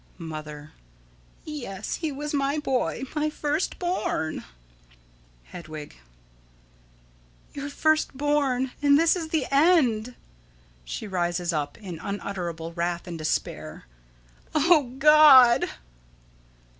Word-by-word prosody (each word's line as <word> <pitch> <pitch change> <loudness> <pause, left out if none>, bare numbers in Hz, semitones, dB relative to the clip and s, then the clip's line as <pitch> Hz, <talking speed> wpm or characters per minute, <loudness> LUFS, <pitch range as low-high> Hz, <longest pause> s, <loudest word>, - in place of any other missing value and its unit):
Mother: 155 -3 -8 0.7
Yes, 240 -10 -5
he 320 -3 -3
was 295 +2 -5
my 280 +1 0
boy 265 -3 -1
my 305 0 0
first 300 +2 -2
born. 350 - -2 1.0
Hedwig: 155 - -10 1.6
Your 285 0 -5
first 310 -1 +1
born, 275 -3 0
and 285 -1 +5
this 330 +2 +4
is 335 -3 -4
the 315 -4 -1
end. 270 -7 +3 0.7
[She - - -6
rises 175 -2 -1
up 145 -2 -3
in 185 -7 -8
unutterable 175 -5 -5
wrath 170 0 -2
and 175 - -6
despair.] 155 - -3 0.7
O 300 -5 +3
God! 280 -4 +7
255 Hz, 100 wpm, -25 LUFS, -, 1.6 s, God